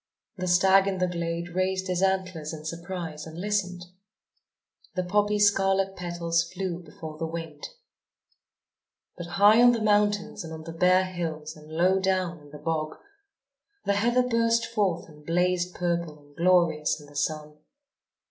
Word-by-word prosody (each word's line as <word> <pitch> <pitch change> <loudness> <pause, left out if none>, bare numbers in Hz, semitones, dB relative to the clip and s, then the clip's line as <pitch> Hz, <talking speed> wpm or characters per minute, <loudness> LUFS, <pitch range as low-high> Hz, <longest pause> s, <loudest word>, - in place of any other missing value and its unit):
The 185 0 -3
stag 190 +2 +5
in 195 -1 -1
the 185 - +1
glade 170 0 -3
raised 185 +1 -1
his 180 -1 -1
antlers 185 -5 -1
in 155 0 -11
surprise 170 -2 -5
and 160 +1 -10
listened. 185 -2 -2 1.1
The 185 - 0
poppy's 205 +3 +2
scarlet 195 -1 +2
petals 170 -1 -1
flew 185 -2 -3
before 155 -1 -10
the 165 - -2
wind. 165 -2 -6 1.5
But 175 -1 -7
high 210 +3 +7
on 245 0 +7
the 235 - -1
mountains 210 -1 +1
and 160 - -8
on 160 0 -7
the 165 0 -8
bare 180 +2 +4
hills 160 -4 -5
and 155 0 -14
low 180 +4 +3
down 185 -3 0
in 145 -1 -16
the 150 - -10
bog, 155 0 -2 0.9
the 200 - +2
heather 240 +5 +2
burst 230 -1 +2
forth 190 -5 -1
and 150 -2 -16
blazed 180 +2 0
purple 170 -3 -2
and 145 -1 -22
glorious 170 -4 +2
in 145 - -13
the 145 0 -17
sun. 150 +1 -3
175 Hz, 155 wpm, -27 LUFS, 160-190 Hz, 1.5 s, high